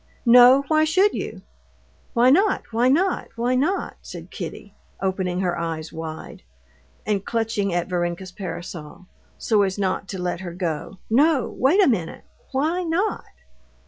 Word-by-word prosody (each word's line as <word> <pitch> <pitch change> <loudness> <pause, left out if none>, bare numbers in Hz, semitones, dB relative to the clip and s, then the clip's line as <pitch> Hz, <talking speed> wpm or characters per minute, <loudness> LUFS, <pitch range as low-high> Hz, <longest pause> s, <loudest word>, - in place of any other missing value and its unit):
"No, 250 +3 +7
why 310 -1 +3
should 375 +6 +3
you?" - - -5 0.7
"Why 245 +2 +5
not? 390 +7 +3
why 240 +3 +3
not? 360 +7 +1
why 240 +2 0
not?" 305 +10 -1
said - - -10
Kitty, - - -7 0.3
opening 185 -1 -1
her 175 -2 0
eyes 165 -1 -4
wide, 160 -1 -7 0.6
and 205 -2 0
clutching 225 -4 -1
at 175 0 -1
Varenka's 175 0 -3
parasol, 175 -2 -8 0.3
so 215 -3 +2
as 190 -1 0
not 195 0 -1
to 190 - -6
let 180 -1 -2
her 175 -2 -7
go. 175 +1 -4
"No, 280 +4 +3
wait 330 +11 +4
a - - +4
minute; 180 -11 -1 0.3
why 315 +7 0
not?" 360 +5 -1
210 Hz, 145 wpm, -23 LUFS, 180-275 Hz, 0.7 s, No